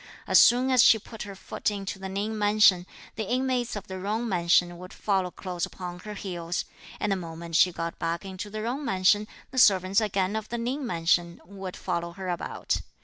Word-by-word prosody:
As - - +6
soon 250 +2 +5
as 255 -2 +6
she 230 - +7
put 220 +1 -11
her 200 - -8
foot 190 - -3
into 195 -1 -5
the 190 0 -6
Ning 205 +3 -2
mansion, 205 -4 +4 0.3
the 220 -3 -3
inmates 250 -2 0
of 205 - -6
the 190 0 -7
Jung 215 +5 -2
mansion 175 -2 +2
would 180 0 -10
follow 190 -3 0
close 180 -2 -6
upon 180 -1 -5
her 210 +3 -8
heels; 175 -3 -4 0.3
and 210 - 0
the - - +3
moment 165 -2 -6
she 180 +2 +5
got 165 0 -5
back 170 +2 -2
into 190 +2 -6
the 215 +1 -5
Jung 255 +6 -2
mansion, 205 -1 +2 0.2
the 260 - 0
servants 195 -1 +5
again 200 -1 0
of 220 -1 -4
the 235 - -3
Ning 250 +4 -2
mansion 170 -2 +1
would 190 0 -8
follow 170 0 -3
her 190 0 -6
about. 175 -1 -2
195 Hz, 205 wpm, -27 LUFS, 175-215 Hz, 0.3 s, she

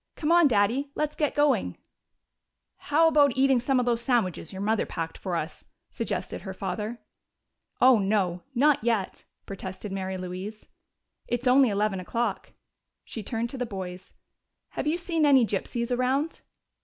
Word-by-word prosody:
"Come 310 +1 -1
on, 345 -2 +6
Daddy! 240 +5 +1
Let's 300 0 -1
get 300 -2 0
going!" 270 - +2 1.0
"How 320 +3 +3
about 290 -5 +4
eating 265 -1 +4
some 255 +2 +1
of 250 - 0
those 235 -1 +1
sandwiches 225 - 0
your 190 0 -5
mother 220 +1 +1
packed 165 -1 -4
for 185 -3 -4
us?" 160 0 -4 0.3
suggested - - -4
her 190 -2 -7
father. 210 +5 -4 0.8
"Oh, 255 -3 +6
no 195 -3 0
not 285 0 +3
yet!" 225 -5 -1 0.2
protested 190 +1 -7
Mary 190 -1 -3
Louise. 185 +4 -7 0.6
"It's 240 +1 -2
only 255 0 +5
eleven 205 -1 0
o'clock." 225 +2 -3 0.5
She 225 - -6
turned 230 +3 -3
to 265 - -7
the 250 - -1
boys. 185 -3 -7 0.6
"Have - - -4
you 315 +3 +1
seen 335 -2 -1
any 270 -5 +6
gypsies 235 +4 -2
around?" 265 +6 0
230 Hz, 155 wpm, -27 LUFS, 195-270 Hz, 1.0 s, on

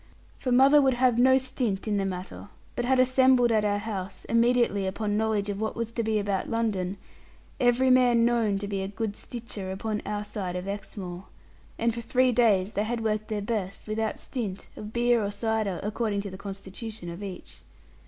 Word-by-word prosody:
For 255 - -3
mother 270 +4 +7
would 265 -2 +3
have 245 -1 +3
no 260 +1 +6
stint 250 -6 -2
in 210 -1 +1
the 195 - 0
matter, 185 +2 -6 0.3
but 240 - -1
had 260 +1 +3
assembled 255 -1 +5
at 215 -2 +3
our 205 -1 +1
house, 195 -3 -5
immediately 230 -4 +2
upon 205 +2 -1
knowledge 215 -1 0
of 200 0 -3
what 220 - -2
was 230 -1 -3
to 230 - -2
be 220 -1 0
about 200 -2 -1
London, 205 -5 -1 0.6
every 250 +1 +4
man 245 -2 +5
known 230 -4 +2
to 200 +1 -4
be 200 -1 -2
a 190 - -2
good 210 +1 -3
stitcher 220 -6 -6
upon 210 +2 -3
our 210 0 -3
side 200 -4 -4
of 180 +1 -4
Exmoor. 195 -2 -6 0.5
And 230 0 +1
for 235 - -5
three 255 +2 +2
days 215 -5 +3
they 205 - 0
had 230 0 -2
worked 215 -1 -1
their 210 -2 -3
best, 200 -4 -3
without 220 0 -1
stint 210 -8 -5
of 210 0 -8
beer 240 -1 +2
or 200 - -1
cider, 210 -3 -1
according 210 -1 -1
to 200 -1 -6
the - - -7
constitution 195 +1 -8
of 170 +4 -8
each. 195 -3 -8
215 Hz, 195 wpm, -27 LUFS, 200-240 Hz, 0.6 s, mother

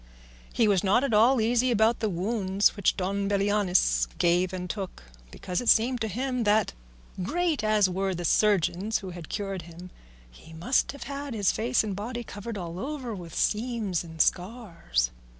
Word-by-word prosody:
He 225 - +2
was 195 -3 +2
not 205 +6 +3
at 275 - -1
all 235 +5 +5
easy 240 +3 +2
about 225 0 +3
the 220 - 0
wounds 195 +1 +1
which 200 -3 +1
Don 200 +1 -1
Belianis 195 - +2
gave 175 +1 +2
and 180 -1 -5
took, 190 - -6 0.3
because 180 - -4
it 245 - 0
seemed 245 +2 +3
to 220 - 0
him 250 +3 -2
that, 210 -1 +2 0.5
great 320 - -1
as 215 -2 +3
were 190 +1 -2
the 175 0 -4
surgeons 205 +2 +2
who 185 - -6
had 175 -2 -9
cured 195 -2 -4
him, 170 +2 -12 0.4
he 160 - -15
must 175 +11 +1
have 280 - -8
had 280 -2 -6
his 205 -3 +2
face 235 +2 +1
and 205 -3 -3
body 240 +4 -5
covered 210 +1 -7
all 175 -1 -6
over 265 -2 -4
with 175 -5 -9
seams 215 -5 -1
and 160 -1 -11
scars. 175 - -2
205 Hz, 175 wpm, -27 LUFS, 180-230 Hz, 0.5 s, all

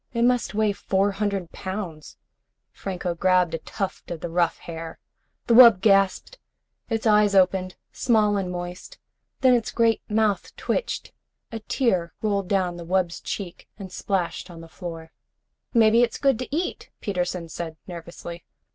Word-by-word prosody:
It 235 -1 +1
must 245 -3 +2
weigh 215 -1 +2
four 195 0 +1
hundred 195 -3 -2
pounds." 185 -6 -6 0.5
Franco 180 -2 -4
grabbed 180 0 +2
a 165 - -2
tuft 195 +3 -5
of 170 - -5
the 170 - -5
rough 170 -1 +1
hair. 165 -1 -8 0.5
The 235 - +2
wub 230 -5 +9
gasped. 195 - +2 0.5
Its 225 -1 -1
eyes 210 -2 +4
opened, 185 -1 +3 0.2
small 215 -3 +2
and 190 -3 -2
moist. 180 - -7 0.4
Then 260 -1 +6
its 235 -2 +1
great 230 -2 +2
mouth 210 -3 0
twitched. - - -2 0.4
A 225 - -4
tear 190 - 0
rolled 200 -3 0
down 180 -3 0
the 170 - -7
wub's 175 0 0
cheek 185 -4 -6
and 195 -3 -8
splashed 185 -2 -2
on 165 -2 -10
the 165 - -11
floor. 165 -1 -8 0.6
"Maybe 230 0 +5
it's 240 -1 +1
good 270 -4 +2
to 255 - -4
eat," 350 +3 -3
Peterson 180 -3 -2
said 160 0 -6
nervously. 170 -1 -8
195 Hz, 155 wpm, -24 LUFS, 175-220 Hz, 0.6 s, wub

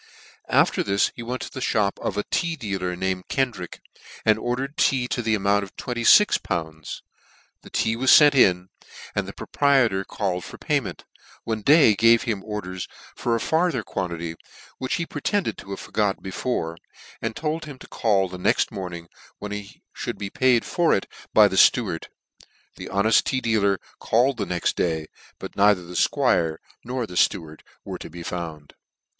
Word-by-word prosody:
After - - +3
this 100 +1 +1
he - - -7
went 125 +2 -4
to - - -8
the 130 - -7
(hop 100 -2 +1
of 100 - -3
a 105 - 0
tea 170 -2 0
dealer 95 - -3
named 95 0 -2
Kendrick, 120 -10 -2 0.4
and 110 0 +4
ordered 130 +5 -3
tea 130 -2 +2
to 125 - -1
the 110 -1 +1
amount 100 0 +2
of 95 - -11
26!. 125 - +4
The 80 -2 -8
tea 110 0 +1
was 130 +3 0
fent 145 -1 +6
in, 90 -8 +3 0.4
and - - -2
the - - -5
proprietor 130 -9 +2
called 95 -3 -3
for - - -10
payment, - - -2 0.4
when 110 -1 -3
Day 145 -2 +6
gave 115 +3 +5
him 110 -6 -2
orders 95 -4 -5 0.3
for 120 -1 0
a - - 0
farther 160 -4 +1
quantity, 85 -4 -4 0.5
which 130 - -1
he 170 - -2
pretended 180 +7 -1
to 95 - -12
have 100 - -5
forgot 105 -3 -1
before; 95 -4 -3 0.4
and - - -3
told 160 +1 -3
him 145 -3 -9
to - - -13
call 100 -4 +1
the 90 0 -9
nexc - - +2
morning, 85 -3 -6 0.3
when 105 - -7
he 105 -1 -8
fhould - - -4
be 100 -1 -5
paid 130 -3 +3
for 175 -2 +2
it 95 - -2 0.3
by - - +7
the - - -3
fteward. - - +4 0.7
The - - -8
honeft 100 +3 +3
tea 130 - 0
dealer 105 -5 +1 0.2
called 125 +3 +2
the 100 - -2
nexc 90 -2 -1
day, 80 -3 -1 0.3
but - - -9
neither 100 -2 +4
the 85 +1 -10
'fquire 80 -2 +2 0.3
nor 125 0 -3
the 90 - -11
fteward 80 -3 0 0.3
were - - -6
to - - -8
be 85 +1 -9
found. 80 -5 -6
105 Hz, 175 wpm, -24 LUFS, 90-125 Hz, 0.7 s, by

